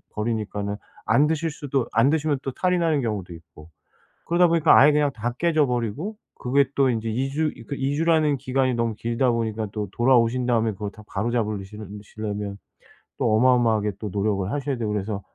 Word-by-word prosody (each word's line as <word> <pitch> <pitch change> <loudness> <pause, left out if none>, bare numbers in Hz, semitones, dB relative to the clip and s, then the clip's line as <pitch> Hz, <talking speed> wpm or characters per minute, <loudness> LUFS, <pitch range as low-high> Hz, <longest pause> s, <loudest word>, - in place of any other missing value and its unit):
버리니까는 105 -2 -2 0.3
안 145 - +4
드실 160 +1 -1
수도 140 -4 -2
안 115 +5 +4
드시면 155 -2 +1
또 135 - -3
탈이 180 +5 0
나는 160 -4 +1
경우도 100 -6 -3
있고 80 -1 -15 0.6
그러다 175 +1 +4
보니까 165 -2 +5
아예 150 +2 +7
그냥 145 -1 +2
다 120 +2 -3
깨져 155 -3 +2
버리고 125 - -3 0.2
그게 140 +2 +2
또 135 -2 +3
인제 115 -1 -2
2 130 +5 -1
주 155 +2 0
이렇게 135 +5 -7
2 135 +2 -1
주라는 160 -2 +2
기간이 130 0 0
너무 115 -2 -1
길다 120 +3 0
보니까 110 -2 -2
또 105 -2 -4
돌아오신 120 0 +3
다음에 115 -2 +2
그걸 105 0 -5
다 110 -1 -14
바로잡으시 105 -2 -2 0.3
시려면 105 -1 -5 0.6
또 110 - +2
어마어마하게 115 -4 +3
또 105 - -4
노력을 100 -1 -1
하셔야 140 -2 -2
되고 110 -3 -2
그래서 100 0 -3
120 Hz, 390 characters per minute, -24 LUFS, 105-140 Hz, 0.6 s, 아예